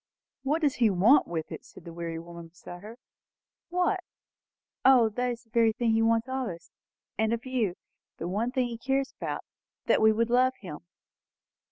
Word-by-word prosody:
'" - - -65
"What 295 +5 0
does 285 -3 +3
he 235 -2 +4
want 210 +10 +5
with 160 -2 -4
it?" - - -7
said 180 - -15
the 170 - -8
weary 165 -1 -5
woman 170 0 -9
beside 175 +1 -11
her. 220 +3 -10 0.7
"What? 360 +2 +1 0.8
O, 260 -3 +7
it - - -4
is 245 -1 -1
the 225 - -34
very 230 -1 +3
thing 235 0 0
he 225 0 +3
wants 225 +1 +2
of 260 -1 -2
us, 170 -3 -8 0.5
and 220 0 +2
of 235 +2 -3
you; 240 -8 -1 0.4
the 170 - -4
one 210 +6 -1
thing 255 -1 +1
he 235 -1 -6
cares 270 +2 -1
about! - - -5 0.4
That - - +3
we 220 0 +6
would 230 +2 0
love 255 +1 +3
him." 175 -7 -9
230 Hz, 195 wpm, -28 LUFS, 185-255 Hz, 0.8 s, O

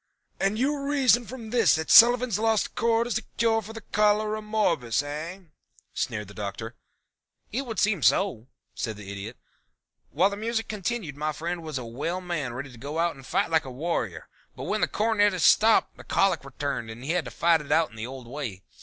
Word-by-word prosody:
"And 195 +2 +1
you 285 +4 0
reason 270 -4 +2
from 235 -4 -8
this 230 -6 +4
that 160 0 -2
Sullivan's 240 -2 +7
Lost 225 -1 +1
Chord 230 +1 +2
is 240 -1 -1
a - - -12 0.2
cure 225 -1 +2
for 220 +1 -10 0.2
Cholera 210 +1 +2
morbus, 170 - 0
eh?" 155 +6 -6 0.5
sneered 105 -3 -3
the 100 - -12
Doctor. 105 +3 -6 0.8
"It 260 +4 -3
would 225 -3 -5
seem 200 -3 +2
so," 125 - +2 0.3
said 110 -3 -4
the 100 -1 -8
Idiot. 100 +4 -7 0.7
"While 185 +7 +2
the 200 - -5
music 225 +1 -2
continued 205 -6 -3
my 155 +1 -1
friend 170 +3 -4
was 155 -3 -5
a 125 - -5
well 145 +10 -3
man 170 -9 -3
ready 135 +2 -6
to 120 - -14
go 145 +5 -5
out 170 0 +1
and 135 - -13
fight 185 +6 0
like 160 -1 +3
a - - -6
warrior, 155 +7 -3 0.3
but - - -7
when - - -1
the - - +3
cornetist 205 -5 +2
stopped 220 +1 +5
the - - -11
colic 195 -7 +1
returned 135 -3 -4
and 115 +2 -9
he 145 - -2
had 175 -3 0
to - - -5
fight 165 -1 +2
it 145 - -9
out 165 -4 +3
in - - -15
the 110 +1 -5
old 130 -1 -9
way. 120 -8 -6
170 Hz, 205 wpm, -26 LUFS, 135-215 Hz, 0.8 s, Sullivan's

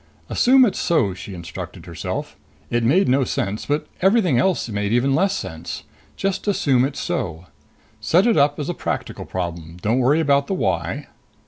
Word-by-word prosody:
Assume 260 +1 +5
it's 205 - -1
so, 125 - +2
she 95 +1 -8
instructed 85 -1 -8
herself. - - -5 0.4
It 120 0 +1
made 160 +12 +3
no 135 +2 +3
sense, 105 -3 -2
but 145 +1 0 0.2
everything 190 - +4
else 185 +2 +1
made 105 -2 -2
even 125 +3 +2
less 195 +7 +2
sense. 80 +1 -6 0.3
Just 195 +1 -2
assume 135 -10 +3
it's 135 0 -4
so. 85 0 -3 0.5
Set 180 +4 +3
it 235 - +4
up 145 0 +3
as 145 - -3
a 175 - -1
practical - - -4
problem. 85 -2 -5
Don't 110 +7 +1
worry 135 +5 +3
about 140 -3 +2
the 195 - -1
why.... - - -1
135 Hz, 175 wpm, -22 LUFS, -, 0.5 s, Assume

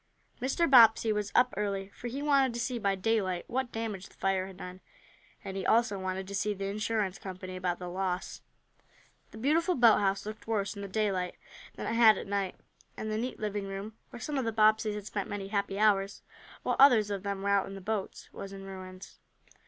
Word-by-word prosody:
Mr. 270 +7 +1
Bobbsey 225 -4 +7
was 210 -1 -2
up 250 0 +4
early, 200 -2 -2
for 240 - -8
he 270 +4 -4
wanted 275 -4 +3
to - - -3
see 240 0 -2
by 200 -2 +1
daylight 190 -3 0
what 255 0 -2
damage 220 -4 -4
the - - -22
fire 190 -1 0
had 190 -1 -11
done, 180 0 -9 0.6
and 190 - -6
he 195 - -3
also 220 -1 +2
wanted 190 0 -3
to 200 - -7
see 205 +1 0
the 195 0 -4
insurance 205 -1 -1
company 185 -1 -7
about 180 -1 -1
the 180 - -7
loss. 185 0 -3 0.9
The - - -12
beautiful 325 +9 +2
boathouse 205 -6 +4
looked 215 +1 -8
worse 210 -2 -1
in 200 - -7
the 200 - -5
daylight 190 -3 -1 0.4
than - - -6
it - - -1
had 225 -3 +7
at - - -5
night, 200 -2 -2 0.4
and 215 - -4
the 215 - -1
neat 250 +3 -4
living 205 -2 -3
room, 195 +3 -6 0.2
where - - -10
some 290 +2 -2
of 260 - -2
the 225 - 0
Bobbseys 215 -1 +3
had 210 -1 -6
spent 205 -1 -4
many 200 -1 -5
happy 200 -1 -1
hours, 200 -2 +2 0.4
while - - 0
others 235 -7 +6
of 200 -2 -2
them 200 -1 -4
were 200 - 0
out 200 -1 +2
in 195 - -8
the - - -7
boats, 205 +1 -4
was 195 - -7
in 195 0 -9
ruins. 185 -1 -10
205 Hz, 215 wpm, -30 LUFS, 195-225 Hz, 0.9 s, Bobbsey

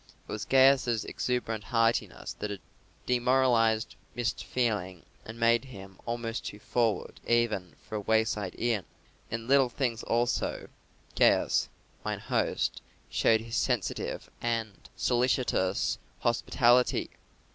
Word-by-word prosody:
It - - -9
was - - -4
Gaius's 130 -4 +4
exuberant 115 -4 -2
heartiness 115 -1 0
that 105 - -3
had 100 -3 -6 0.4
demoralised 120 -3 +2 0.2
Mr. 120 -3 -1
Fearing 105 -8 -2 0.2
and 110 +1 -9
made 115 +2 +3
him 95 -7 -11
almost 115 0 -3
too 105 - -6
forward 115 +1 -1
even 110 -8 +1
for 110 - -3
a - - -3
wayside 110 -2 0
inn. 115 -6 0 0.4
In 115 +1 -4
little 135 -1 +5
things 120 -2 -1
also 120 +1 -1 0.5
Gaius, - - +3 0.3
mine - - -2
host, - - -1 0.3
showed 110 -1 +3
his 115 +1 -6
sensitive 125 -6 -1
and 115 -2 -1 0.2
solicitous 120 -6 +1 0.2
hospitality. 120 +1 +3
115 Hz, 115 wpm, -29 LUFS, 110-125 Hz, 0.5 s, little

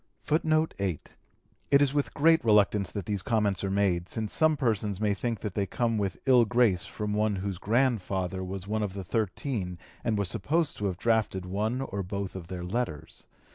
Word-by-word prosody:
[Footnote 155 +1 +2
8: 95 -6 -3 0.5
It 140 - +6
is 140 -1 +2
with 145 -1 -1
great 160 0 +4
reluctance 105 -3 +3
that 100 0 -5
these 100 -3 -1
comments 105 -3 0
are 95 - 0
made, 95 -3 +1
since 110 -2 -3
some 155 -1 +3
persons 105 -6 0
may 105 -1 +2
think 115 +2 -3
that 105 -4 -4
they 100 -1 -1
come 115 +2 0
with 95 -4 -2
ill 125 -3 +6
grace 115 -6 +2
from 105 -1 -4
one 105 0 +1
whose 95 -1 -4
grandfather 95 -6 0
was 95 +1 -6
one 110 +1 -1
of 100 -3 -2
the 100 - -4
thirteen 100 -1 -2 0.3
and 110 -3 0
was 100 -2 0
supposed 155 - 0
to 105 - -1
have 90 -3 -3
drafted 110 -4 +1
one 105 +7 -1
or 100 -7 -3
both 95 +1 -4
of 90 -3 -7
their 90 0 -5
letters. 90 -6 -4
105 Hz, 195 wpm, -28 LUFS, 95-120 Hz, 0.5 s, It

